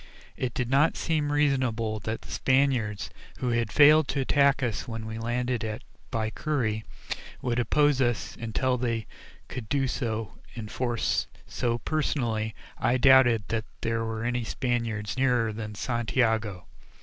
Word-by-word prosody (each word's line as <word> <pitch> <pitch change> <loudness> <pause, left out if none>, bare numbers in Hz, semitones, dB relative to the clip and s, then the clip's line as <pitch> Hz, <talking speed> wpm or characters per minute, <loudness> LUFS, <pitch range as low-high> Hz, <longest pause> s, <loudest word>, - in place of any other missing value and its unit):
It 125 -2 -3
did 125 - -1
not 140 +5 +3
seem 150 -3 0
reasonable 130 -7 +1
that 110 +2 -4
the - - -11
Spaniards, 130 -6 +1 0.3
who 125 - -1
had 115 -2 0
failed 150 +1 +7
to 140 - -1
attack 140 +1 +3
us 115 -1 -2
when 115 -2 -5
we 110 0 -5
landed 120 +1 -1
at 110 0 -4 0.3
Baiquiri, 110 0 -1 0.6
would 120 -1 0
oppose 145 +3 +3
us 120 -4 0
until 125 +3 -1
they 115 -2 -1 0.4
could 120 -5 -7
do 135 -2 +1
so 115 -4 -3 0.2
in 110 -3 -6
force, 120 0 0 0.2
so, 120 -1 -1
personally, 115 -7 -1 0.2
I 125 - +2
doubted 120 -4 +6
that 110 -1 -1 0.2
there 115 0 0
were 110 0 -3
any 120 0 -1
Spaniards 115 -3 -2
nearer 125 -4 +2
than 105 -1 -6
Santiago. 110 -5 0
120 Hz, 145 wpm, -27 LUFS, 110-130 Hz, 0.6 s, failed